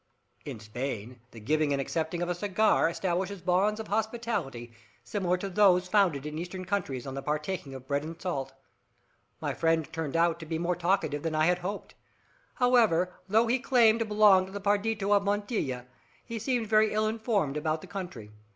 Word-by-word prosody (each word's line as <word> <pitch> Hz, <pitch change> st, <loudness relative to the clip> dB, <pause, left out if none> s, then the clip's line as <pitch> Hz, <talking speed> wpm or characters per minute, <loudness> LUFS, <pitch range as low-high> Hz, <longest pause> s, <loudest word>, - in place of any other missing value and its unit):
In -, -, -6 dB
Spain 120 Hz, +1 st, -5 dB
the 115 Hz, -, -12 dB
giving 150 Hz, +6 st, +1 dB
and 140 Hz, -, +1 dB
accepting 160 Hz, +4 st, -2 dB
of -, -, -2 dB
a -, -, +1 dB
cigar 200 Hz, 0 st, +2 dB
establishes 185 Hz, +3 st, -2 dB
bonds 185 Hz, +4 st, +1 dB
of 220 Hz, -, -6 dB
hospitality 215 Hz, -, -2 dB, 0.3 s
similar 180 Hz, +6 st, -1 dB
to 195 Hz, -, -4 dB
those 185 Hz, -2 st, +4 dB
founded 180 Hz, -8 st, +2 dB
in 150 Hz, +1 st, -4 dB
Eastern 185 Hz, +2 st, -6 dB
countries 175 Hz, -10 st, -2 dB
on 135 Hz, -, -5 dB
the 135 Hz, -, -4 dB
partaking 150 Hz, 0 st, -3 dB
of 130 Hz, -1 st, -10 dB
bread 140 Hz, +1 st, 0 dB
and 165 Hz, +1 st, -7 dB
salt. 140 Hz, -8 st, -3 dB, 0.9 s
My -, -, -1 dB
friend 165 Hz, -2 st, +1 dB
turned 160 Hz, -4 st, -3 dB
out 170 Hz, 0 st, +2 dB
more 170 Hz, +2 st, 0 dB
talkative 175 Hz, -4 st, 0 dB
than 160 Hz, 0 st, -2 dB
I 155 Hz, 0 st, +3 dB
had 180 Hz, +1 st, +2 dB
hoped. 195 Hz, +4 st, -5 dB, 0.6 s
However, 225 Hz, -9 st, +3 dB, 0.2 s
though 220 Hz, +3 st, +4 dB
he 240 Hz, +3 st, +1 dB
claimed 235 Hz, -3 st, +4 dB
to 230 Hz, -, 0 dB
belong 210 Hz, -3 st, +5 dB
to -, -, -11 dB
the 200 Hz, -, -5 dB
partido 205 Hz, 0 st, 0 dB
of 200 Hz, -, +4 dB
Montilla, 200 Hz, -, -2 dB, 0.4 s
he 230 Hz, -1 st, -5 dB
seemed 245 Hz, 0 st, 0 dB
very 215 Hz, 0 st, +3 dB
ill 215 Hz, 0 st, +1 dB
informed 215 Hz, -, 0 dB
about 155 Hz, +1 st, -1 dB
the -, -, -10 dB
country. 175 Hz, -, -7 dB
180 Hz, 180 wpm, -29 LUFS, 150-205 Hz, 0.9 s, belong